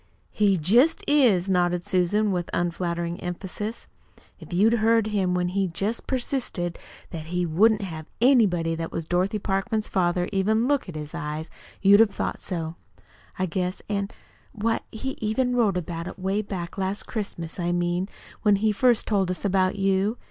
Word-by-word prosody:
"He 200 -3 +3
jest 235 - +3
is," 235 -11 +4
nodded 180 -2 +1
Susan 200 +4 +2
with 175 -2 -2
unflattering 170 0 -2
emphasis. 190 +5 -5 0.5
"If - - -12
you'd 205 +6 +4
heard 225 0 +4
him 195 -4 0
when 180 0 0
he 195 +1 0
jest 200 +7 -3
persisted 240 -9 -2 0.3
that 160 -2 -6
he 180 +1 -1
wouldn't 205 +6 +3
have 160 -4 -7
anybody 205 -10 +4
that 165 0 -4
was 165 - -4
Dorothy 185 +5 0
Parkman's 200 +2 -1
father 175 -1 +1
even 215 +4 +2
look 285 -8 +1
at 170 - -8
his 150 -1 -6
eyes 150 +2 -5 0.3
you'd 200 +1 +7
have 225 -2 +6
thought - - -2
so, 165 -2 -4 0.6
I 185 - +1
guess. 180 +1 -3
An' 200 -1 -1 0.4
why, 225 +1 0
he 265 +5 -5
even 245 +4 0
wrote 215 -6 +2
about 170 -1 -4
it - - -8
'way 195 +2 0
back 190 -2 -6
last 195 +2 -1
Christmas 195 -7 -5
I 175 0 0
mean, 175 +2 0 0.3
when 210 -1 +4
he 215 +2 +2
first 240 +2 +3
told 195 -4 +1
us 185 +2 -4
about 190 -1 +2
you. 195 +3 +1
190 Hz, 170 wpm, -25 LUFS, 175-215 Hz, 0.6 s, you'd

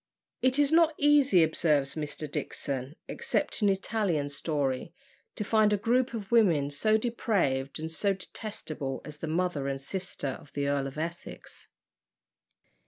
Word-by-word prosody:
It 255 +1 +3
is 290 0 +3
not 325 -1 +5
easy, 285 - +5
observes 150 -3 +2
Mr. 150 0 -3
Dixon, 140 -1 -3
except 470 - -1
in 205 - +4
Italian 190 -6 0
story, 145 +1 -2 0.4
to - - -2
find 215 0 +3
a 210 - +3
group 245 +4 +1
of 210 -2 -6
women 170 -12 +4
so 215 +9 +3
depraved 195 - 0
and 160 +1 -4
so 195 +5 +1
detestable 160 -9 -5
as 150 0 -9
the 160 - -4
mother 160 -3 -1
and 135 0 -2
sisters 145 -3 -4
of 145 - -18
the 140 0 -1
Earl 140 -1 0
of 135 - -9
Essex. 170 +2 -7
170 Hz, 150 wpm, -29 LUFS, 145-220 Hz, 0.4 s, not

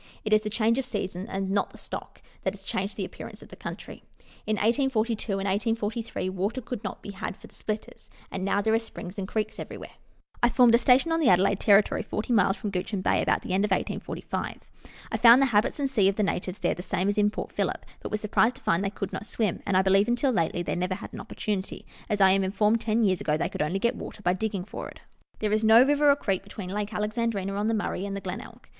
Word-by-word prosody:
It 215 - +1
is 215 - +5
the 215 - -3
change 225 +3 +2
of 265 - -2
seasons, 200 -4 -4
and 195 0 -2
not 200 0 +1
the - - -15
stock, - - -8 0.2
that - - -1
has - - -16
changed - - -3
the - - -2
appearance - - -10
of - - -15
the - - -11
country. - - -8 0.5
In 215 - +2
1842 230 -2 +1
and 195 0 -2
1843 220 +1 -1
water 195 +6 -2
could 240 -2 -6
not 205 - -6
be 205 - -6
had 195 0 -5
for - - -14
the - - -17
splitters, 215 0 -6 0.2
and 190 - -4
now 200 +1 +1
there 220 +1 +2
are 225 - +4
springs 205 -4 -8
and 190 - -3
creeks 215 +1 -2
everywhere. - - -8 0.5
I 240 - +5
formed 240 -1 +5
a 235 - +7
station 260 +6 +4
on 325 - +2
the 310 - +4
Adelaide 190 +2 +4
territory, 205 -1 +4
40 220 +3 -3
miles 195 -2 +3
from 205 - -4
Guichen 190 +1 -2
Bay, - - +2
about - - +1
the - - -3
end 195 +2 +2
of 210 - +1
1845. 190 - -3 0.5
I - - 0
found 235 +1 +8
the 275 - +5
habits, 210 +7 +2
&c., 210 -8 +4
of 195 - +2
the 215 - +1
natives 185 -1 -2
there - - 0
the 180 - -7
same 185 +1 -1
as 205 +1 +1
in 205 0 +4
Port - - -6
Phillip, - - -2 0.2
but - - -5
was 215 - -1
surprised 220 +3 +2
to - - -15
find 170 +3 +2
they 200 - 0
could 195 -1 -5
not 210 - -5
swim; 215 -7 -1
and 195 -2 +3
I 190 - +4
believe, 195 +2 +4
until 245 +3 +2
lately, 175 -4 0
they - - -2
never 180 +1 -1
had 200 - -9
an - - -6
opportunity, 200 -2 -4 0.2
as 210 -1 0
I 190 -1 +7
am 195 0 +3
informed 210 +4 +2
ten 225 +1 +1
years 185 -3 +2
ago 150 0 +1
they - - -1
could - - -4
only 150 +6 0
get 235 +4 +1
water 205 - -8
by 180 - +3
digging 195 -1 -3
for - - -7
it. - - -14 0.4
There 210 -1 -1
is 215 +1 +1
no 220 +2 +8
river 290 +1 +4
or 280 - +6
creek 195 -9 -1
between 195 -1 -8
Lake 210 +1 -2
Alexandrina 210 -2 -1
on 205 +2 -1
the 225 - +1
Murray 205 -3 -2
and 200 - -4
the 200 - -5
Glenelg. 185 0 -8
210 Hz, 250 wpm, -27 LUFS, 195-225 Hz, 0.5 s, found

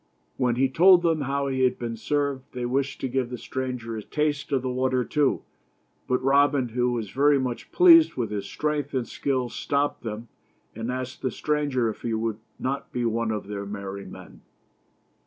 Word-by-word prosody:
When 125 -2 +1
he 135 +2 +3
told 175 +6 +6
them 165 -3 +2
how 140 +1 -1
he 130 -1 -1
had 130 -1 +3
been 115 -1 -4
served, 140 +2 -2
they 125 -1 -3
wished 135 +3 -1
to - - 0
give 130 -1 -1
the 125 - -5
stranger 125 -3 -4
a 110 - -4
taste 145 +4 -2
of 135 -2 +1
the - - -2
water 130 0 +1
too, 145 -3 +1 0.6
but 125 0 0
Robin, 140 -1 +3
who 125 +2 0
was 110 -4 -3
very 145 +1 +4
much 125 -3 -3
pleased 335 -3 +7
with 120 -4 -2
his 100 -1 -3
strength 150 +1 -2
and 125 -2 -1
skill, 130 -3 -1
stopped 140 +4 -1
them, 115 +1 -6 0.5
and 115 +3 -4
asked 130 +1 -5
the 130 - 0
stranger 145 -4 0
if 110 - -5
he 115 -2 -1
would 110 -1 -2 0.2
not 135 +2 -3
be 120 -1 -1
one 115 0 0
of 105 -2 -2
his 100 0 -5
merry 100 -1 -6
men. - - -12
130 Hz, 195 wpm, -25 LUFS, 115-140 Hz, 0.6 s, pleased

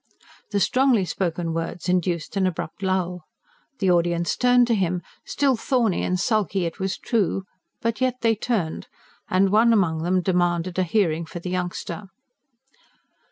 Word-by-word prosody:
The 205 -1 0
strongly 250 -2 +3
spoken 170 -2 -2
words 165 +1 -4
induced 180 -2 0
an 190 -1 +2
abrupt 170 0 -5
lull. 180 -3 -1 0.5
The 190 -5 +2
audience 170 0 +1
turned 245 -1 +4
to 235 - +1
him, 180 -4 0 0.2
still 275 -2 +1
thorny 235 -5 +1
and 185 0 0
sulky 195 -3 +1
it 165 - -5
was 190 0 -2
true, 200 -4 0 0.4
but 230 +2 -1
yet 255 -1 +2
they 230 -1 +3
turned; 210 -7 -2 0.4
and 190 +1 +3
one 225 +3 +5
among 175 -8 +2
them 180 +2 +1
demanded 175 -1 0
a - - +3
hearing 170 -4 0
for - - -8
the 180 +1 -5
youngster. 180 +1 -4
185 Hz, 155 wpm, -24 LUFS, 175-215 Hz, 0.5 s, one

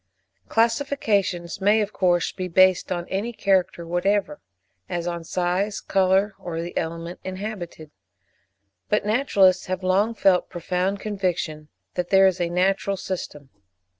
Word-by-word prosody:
Classifications 225 - 0
may, 205 +3 +4
of 210 -1 -2
course, 175 -2 +2
be 185 -1 -5
based 185 +1 +4
on 175 -1 -2
any 205 +5 -2
character 190 -5 0
whatever, 175 0 0 0.5
as 175 -1 -3
on 170 -1 -3
size, 180 +4 -1
colour, 195 +2 +2
or 165 -2 -5
the 170 +1 -5
element 170 +1 -4
inhabited; 185 -5 -6 1.0
but 210 -1 +1
naturalists 205 -5 +3
have 185 0 -3
long 200 +5 +2
felt 190 -4 +3
a - - -42
profound 180 +3 -1
conviction 180 -7 -3 0.3
that 180 -1 -3
there 195 0 +6
is 185 -1 +2
a 170 - 0
natural 195 +2 +1
system. 150 -8 -6
185 Hz, 135 wpm, -24 LUFS, 175-200 Hz, 1.0 s, there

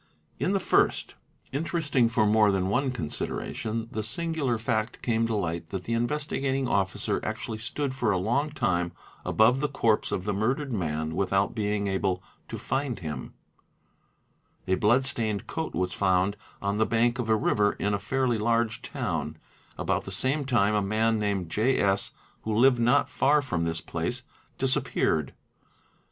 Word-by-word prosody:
In 185 - +1
the 195 - +2
first, - - +2 0.4
interesting 145 -4 +1
for 115 -2 +2
more 105 0 +4
than 95 -1 0
one 130 +6 +1
consideration, 115 +2 -3
the 110 - -2
singabil 135 +1 -1
fact 110 +1 -2
came 115 -1 +1
to 115 - -1
light 85 -4 -2
that 95 -2 -4
the 115 - -3
Investigating 135 +1 -1
Officer 95 -4 0
actually 110 - -4
stood 130 +4 -3
for 120 -5 +1
a 95 - +2
long 120 +11 0
time 90 - 0 0.3
above 115 +4 +4
the 150 +1 0
corpse 115 -6 +1
of 90 - -1
the 105 +1 -1
murdered 130 +7 -1
man 80 -5 -2
without 95 +1 +1
being 105 -1 -1
able 95 -2 -1 0.2
to - - -6
find 135 -4 -2
him, 75 -2 -6 1.3
A 95 - +2
blood 115 +7 +3
stained 110 -6 -1
coat 160 -1 -4
was 90 -1 -1
found 95 +1 +2 0.3
on 100 +1 0
the 110 - +3
bank 120 +2 +2
of 115 -2 -2
a 110 - +5
river 105 -1 +2
in 105 - -1
a 100 - 0
fairly 125 +2 0
large 115 0 +1
town: - - -3 0.4
about - - -1
the - - -6
same 140 +2 +2
time 110 -6 +2
a 105 - +2
man 110 +2 +1
named 100 -5 -1
J. 115 +9 +2
S. 100 0 +1 0.3
who 110 -1 -2
lived 125 +2 +5
not 120 +1 +3
far 150 +2 +3
from 90 - -2
this 80 0 -2
place 90 +10 -3 0.3
disappeared. 80 - +1
110 Hz, 165 wpm, -27 LUFS, 100-130 Hz, 1.3 s, a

